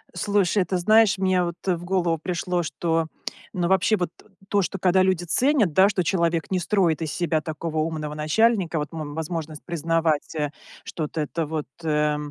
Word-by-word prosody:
Слушай, 200 +1 +2
ты 185 - -1
знаешь, 215 +2 +4
мне 185 -1 +2
вот, 170 -1 -3
э, 185 - +3
в 170 - -9
голову 175 -2 0
пришло, 175 +1 -2
что, 165 0 -1 0.5
ну, 175 -3 0
вообще, 190 +3 +3
вот 180 -3 -1 0.4
то, 205 - +3
что, 195 0 -3
когда 185 0 +3
люди 185 -2 +1
ценят, 245 - +2
да, 190 +5 +6
что 195 -3 0
человек 170 -2 0
не 185 - 0
строит 175 -3 +1
из 160 -2 -2
себя 165 -2 0
такого 160 +1 -5
умного 155 -1 -2
начальника, 175 +3 +2
вот, 150 +2 -5
м, 155 -3 -5
возможность 160 -1 -5
признавать, 165 -2 0
э, 150 -2 -1 0.3
что 155 -3 -4
это 160 +1 -2
вот, 155 0 -4 0.2
э, 150 -1 +1
170 Hz, 180 wpm, -24 LUFS, 160-190 Hz, 0.5 s, да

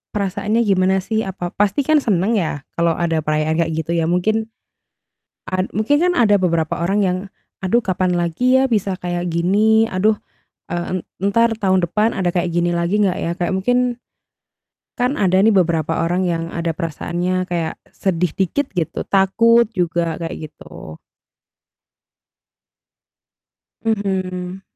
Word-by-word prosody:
perasaannya 205 +3 0
gimana 190 -2 +2
sih? 220 +1 -1
Apa 180 -2 -5
pasti 205 +6 +2
kan 310 +3 +3
seneng 215 -2 +1
ya 155 -6 -2 0.2
kalau 170 0 +2
ada 165 -2 0
perayaan 155 +1 0
kayak 165 - +1
gitu 165 - -5
ya 165 - +1
mungkin 215 +6 +1 1.0
a 185 0 0
mungkin 220 +8 +1
kan 360 - +3
ada 210 -4 +5
beberapa 165 -2 0
orang 195 +4 +1
yang, 185 0 0 0.5
"Aduh 190 +6 +3
kapan 185 -1 0
lagi 180 +10 +2
ya 265 - +3
bisa 200 -5 0
kayak 175 0 -3
gini? 210 +6 +3
Aduh, 210 +3 +2 0.6
e - - -2
en 180 +1 -2 0.3
entar 230 +4 +3
tahun 190 -3 +2
depan 215 +6 +1
ada 185 -2 0
kayak 175 0 -1
gini 175 0 +1
lagi 170 +5 0
nggak 185 -3 +1
ya?" 170 - -2
Kayak 175 +1 -1
mungkin 245 +6 +2 1.2
kan 250 +3 +1
ada 185 -1 +3
nih 220 - +5
beberapa 165 -3 +1
orang 180 +2 0
yang 165 -1 -1
ada 170 -1 -2
perasaannya 175 +2 -2
kayak 170 -2 -2 0.2
sedih 180 -2 -1
dikit 195 +10 0
gitu 165 - -2
takut 230 +5 +4
juga 170 -3 -1
kayak 160 -2 -6
gitu. 80 0 -12 2.8
Mhm. 190 -4 -2
185 Hz, 145 wpm, -19 LUFS, 170-210 Hz, 2.8 s, ada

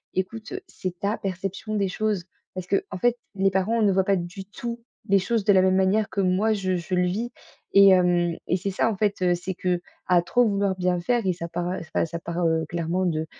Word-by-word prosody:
«Écoute, 215 +4 -3
c'est 185 -1 -6
ta 205 +3 -1
perception 195 +2 -4
des 200 -2 +1
choses», 205 -2 -1 0.3
parce 185 -1 -5
qu'en 195 -1 -1
fait, 240 +4 +2 0.2
les 195 0 +3
parents 200 +5 +1
ne 205 -2 +4
voient 190 0 +3
pas 195 +1 +2
du 180 +2 -5
tout 235 +4 -6 0.3
les 200 - +6
choses 220 +4 0
de 205 - +4
la 190 - +6
même 185 0 +3
manière 195 +3 +2
que 200 - -1
moi 190 +4 +2
je 185 -3 -1
je 175 +2 -3
le 180 0 +2
vis 210 +7 -2 0.4
et 200 0 +8
hem 175 -2 +3
et 180 - +2
c'est 195 +2 -3
ça, 205 +4 +1
en - - -3
fait, 205 -1 0
heu, 180 -1 +4
c'est 180 +2 -4
qu'à 180 0 0
trop 245 +8 +2
vouloir 200 -2 0
bien 180 -1 0
faire 240 +3 0
et 185 - +2
ça 170 -1 -6
part, 175 +1 -3
heu 185 - -2
enfin, 165 0 -1
ça 170 0 -6
part, 170 +1 -2
heu, 160 -1 +1
clairement 170 +2 -1
de 160 -2 -1
190 Hz, 235 wpm, -25 LUFS, 180-200 Hz, 0.4 s, et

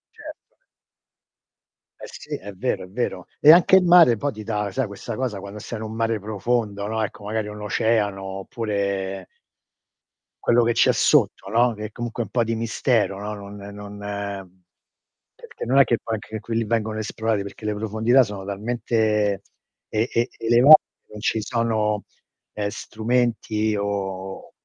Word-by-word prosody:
Certo. - - -12 1.4
Eh - - -9
sì, - - -7
è 100 +1 -8
vero, 100 +4 -2
è 90 - -10
vero. 120 +6 -3
E 150 - +9
anche 175 +3 +7
il 190 - +4
mare 170 -9 +7
poi 140 +5 -2
ti 110 - -8
dà, 105 -1 -2
sai 130 +4 -1
questa 105 +2 -7
cosa 115 -5 -3
quando 100 +2 -8
stai 110 +1 -6
in 110 - -5
un 110 - -6
mare 115 -1 0
profondo, 105 0 -2
no, 110 0 -2
ecco 110 +1 -4
magari 110 0 -2
un 105 0 -8
oceano 105 -1 0 0.2
oppure 100 -3 -3 1.2
quello 120 0 +4
che 120 +1 +2
c'è - - +4
sotto, 95 - +2
no, 120 +3 +3
che 105 0 -6
è 110 - -7
comunque 120 0 -4
un 105 - -11
po' 120 +2 +1
di 115 0 -2
mistero, 110 -3 0
no, 105 +1 -4
non 100 -1 -9 0.2
non 105 0 -9 1.4
perché - - -9
non 130 +4 +3
è - - +9
che 120 - +1
poi 115 - -3
anche 110 +1 -7
quelli 115 +1 -2
vengono 110 0 -1
esplorati, 110 0 -1
perché 100 +2 -10
le 105 - 0
profondità 110 +5 +3
sono 100 -3 -7
talmente 105 -1 0 0.5
e 110 +2 0
e 120 +2 +1
elevate, 120 +7 +7 0.3
non 105 - -9
ci 110 0 0
sono, 110 -3 0 0.5
ehm, 105 -1 -2
strumenti 110 -1 -1
o 95 -2 -4
110 Hz, 165 wpm, -23 LUFS, 100-115 Hz, 1.4 s, E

